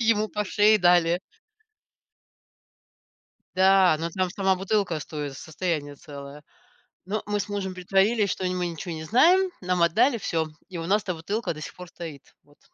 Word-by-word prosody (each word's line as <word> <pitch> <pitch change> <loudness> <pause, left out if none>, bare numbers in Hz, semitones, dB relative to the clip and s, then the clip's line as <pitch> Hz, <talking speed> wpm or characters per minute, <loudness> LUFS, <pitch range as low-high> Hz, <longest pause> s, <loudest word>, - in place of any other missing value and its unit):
ему 220 -2 +2
по 210 0 -2
шее 210 +2 +4
дали. 175 -1 +4 2.4
Да. 190 -2 +5
Но 165 +1 -3
там 185 +1 -1
сама 190 0 +1
бутылка 195 -3 0
стоит, 145 -2 -6
состояние 155 -3 -3
целое. 140 -1 -10 0.6
Но 210 +3 -3
мы 205 0 -1
с 205 - -4
мужем 195 -2 -3
притворились, 195 +3 +2
что 185 - -2
не 180 - -1
мы, 180 -1 -1
ничего 170 +1 -6
не 160 0 -6
знаем, 350 - +4
нам 180 -1 0
отдали 230 +9 +3
всё, 165 -5 -1 0.2
и 180 - -7
у 165 - -4
нас 205 +3 +2
эта 180 - -3
бутылка 200 +8 -3
до 155 - -10
сих 155 - -8
пор 180 -1 -10
стоит. 160 -6 -10
Вот. 145 0 -25
180 Hz, 170 wpm, -25 LUFS, 165-205 Hz, 2.4 s, Да